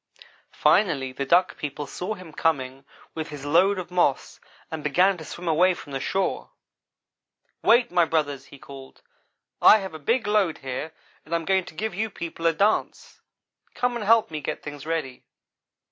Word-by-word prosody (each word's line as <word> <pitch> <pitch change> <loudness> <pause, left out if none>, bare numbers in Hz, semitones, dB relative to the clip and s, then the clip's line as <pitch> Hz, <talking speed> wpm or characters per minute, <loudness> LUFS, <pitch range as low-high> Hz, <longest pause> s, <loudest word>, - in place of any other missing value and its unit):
Finally 145 -10 +2
the 135 +1 -5
Duck 180 +4 +3
people 145 0 -4
saw 185 +8 -5
him 180 -5 -12
coming 135 -4 -1 0.3
with 160 -1 -5
his 145 -2 -8
load 180 +7 +3
of 180 -1 -6
moss 175 -7 0 0.3
and 160 -2 -5
began 180 +6 +3
to - - -8
swim 175 +3 -8
away 175 +3 +3
from 145 - -11
the 135 - -3
shore. 190 +7 -2 1.1
"'Wait, 240 +1 +4
my 175 - +4
brothers!' 145 -4 -1
he 140 - -14
called, 135 -1 -13 0.6
'I 215 - +8
have 190 -4 -6
a 155 - -8
big 230 - 0
load 205 -6 +1
here, 135 +3 -5 0.3
and 165 +2 -3
I - - +4
am 165 - -7
going 190 0 +2
to - - -12
give 215 +4 -3
you 220 +4 -2
people 170 -3 -4
a 165 - +3
dance. 200 +7 -1 0.5
Come 245 0 0
and 235 - -3
help 225 -2 +4
me 155 -1 -4
get - - -5
things 145 0 -8
ready. 160 -6 -3
165 Hz, 180 wpm, -25 LUFS, 145-190 Hz, 1.1 s, I